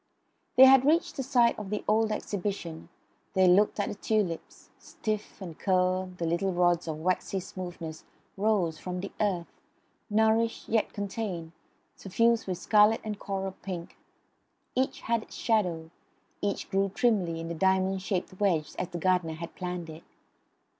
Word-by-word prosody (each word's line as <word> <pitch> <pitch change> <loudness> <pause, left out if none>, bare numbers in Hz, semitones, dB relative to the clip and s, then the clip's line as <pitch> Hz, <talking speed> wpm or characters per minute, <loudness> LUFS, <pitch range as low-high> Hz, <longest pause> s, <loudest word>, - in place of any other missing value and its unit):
They 260 - +10
had 265 -1 +7
reached 315 +5 +2
the - - -2
site 245 -4 +3
of 205 -2 -6
the 210 0 -2
old 220 +1 +3
Exhibition. 185 -6 -4 0.5
They 190 -1 +5
looked 200 +4 +4
at 205 - +1
the - - -3
tulips. 205 -5 -2
Stiff 215 -1 -5
and 175 -5 -8
curled, 185 -1 +1
the 170 - -2
little 170 +4 0
rods 175 -1 +2
of 155 -1 -3
waxy 185 +2 0
smoothness 175 -4 -7 0.3
rose 195 -6 +1
from 180 0 -4
the 200 - -6
earth, 185 -5 -2 0.5
nourished 220 +2 +2
yet 220 -1 +1
contained, 195 -5 -4 0.4
suffused 230 +4 +1
with 185 -2 -2
scarlet 210 +3 +4
and 210 -2 -5
coral 195 -1 -3
pink. 175 -3 -6 0.8
Each 260 +1 -1
had 230 0 0
its - - -12
shadow; 175 -8 0 0.5
each 200 -1 -2
grew 195 +1 +2
trimly 190 -9 +1
in 165 - -5
the 170 - -3
diamond 190 +2 +1
shaped 185 -1 -3
wedge 175 -7 +1
as 180 - -1
the 175 - -5
gardener 180 -2 +1
had 170 +1 -7
planned 180 -2 -5
it. 160 0 -9
190 Hz, 155 wpm, -29 LUFS, 175-215 Hz, 0.8 s, They